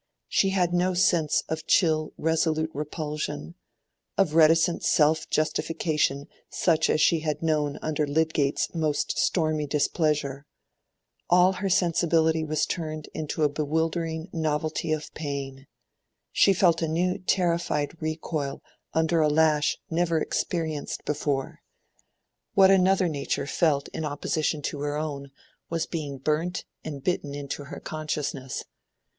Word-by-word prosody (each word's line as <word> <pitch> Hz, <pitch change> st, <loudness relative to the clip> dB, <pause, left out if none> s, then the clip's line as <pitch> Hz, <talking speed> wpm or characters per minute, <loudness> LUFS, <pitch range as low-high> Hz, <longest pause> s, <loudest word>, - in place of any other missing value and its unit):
She 195 Hz, -, +2 dB
had 180 Hz, -2 st, +1 dB
no 180 Hz, +1 st, +2 dB
sense 175 Hz, -4 st, +2 dB
of 160 Hz, 0 st, -4 dB
chill 155 Hz, -3 st, +3 dB
resolute 160 Hz, 0 st, +1 dB
repulsion, 150 Hz, -, -4 dB, 0.6 s
of 190 Hz, -6 st, +2 dB
reticent 165 Hz, +2 st, +4 dB
self 155 Hz, +1 st, +3 dB
justification 155 Hz, -2 st, 0 dB, 0.2 s
such 165 Hz, -3 st, +2 dB
as -, -, +2 dB
she 160 Hz, +1 st, +4 dB
had 155 Hz, 0 st, -3 dB
known 150 Hz, -3 st, 0 dB
under 150 Hz, -1 st, 0 dB
Lydgate's 150 Hz, -1 st, 0 dB
most 155 Hz, -3 st, 0 dB
stormy 155 Hz, -3 st, +1 dB
displeasure: 145 Hz, -1 st, 0 dB, 0.8 s
all 180 Hz, +1 st, +6 dB
her 195 Hz, +1 st, -2 dB
sensibility 165 Hz, -3 st, +2 dB
was 155 Hz, 0 st, 0 dB
turned 155 Hz, -3 st, -4 dB
into 155 Hz, 0 st, -2 dB
a -, -, +6 dB
bewildering 160 Hz, +2 st, -2 dB
novelty 155 Hz, 0 st, -1 dB
of 155 Hz, -1 st, -3 dB
pain; 140 Hz, -2 st, -5 dB, 0.6 s
she 200 Hz, -, +5 dB
felt 175 Hz, -3 st, +3 dB
a 165 Hz, -, +1 dB
new 180 Hz, +3 st, 0 dB
terrified 170 Hz, -4 st, 0 dB
recoil 155 Hz, -3 st, -3 dB, 0.3 s
under 160 Hz, +1 st, +2 dB
a 155 Hz, -, +4 dB
lash 150 Hz, -1 st, +3 dB
never 165 Hz, 0 st, +1 dB
experienced 160 Hz, -3 st, -2 dB
before. 145 Hz, -2 st, -2 dB, 1.0 s
What 195 Hz, -1 st, +7 dB
another 190 Hz, 0 st, +4 dB
nature 145 Hz, -4 st, -2 dB
felt 145 Hz, -2 st, +1 dB
in -, -, -5 dB
opposition 150 Hz, +1 st, -1 dB
to 145 Hz, -, -3 dB
her 145 Hz, +1 st, -2 dB
own 145 Hz, -3 st, -4 dB, 0.4 s
was 165 Hz, -1 st, -1 dB
being 145 Hz, -5 st, -5 dB
burnt 155 Hz, +7 st, -1 dB, 0.2 s
and 145 Hz, -4 st, -6 dB
bitten 145 Hz, -6 st, -1 dB
into 145 Hz, 0 st, -5 dB
her -, -, -8 dB
consciousness. 150 Hz, -4 st, -4 dB
155 Hz, 125 wpm, -26 LUFS, 150-165 Hz, 1.0 s, What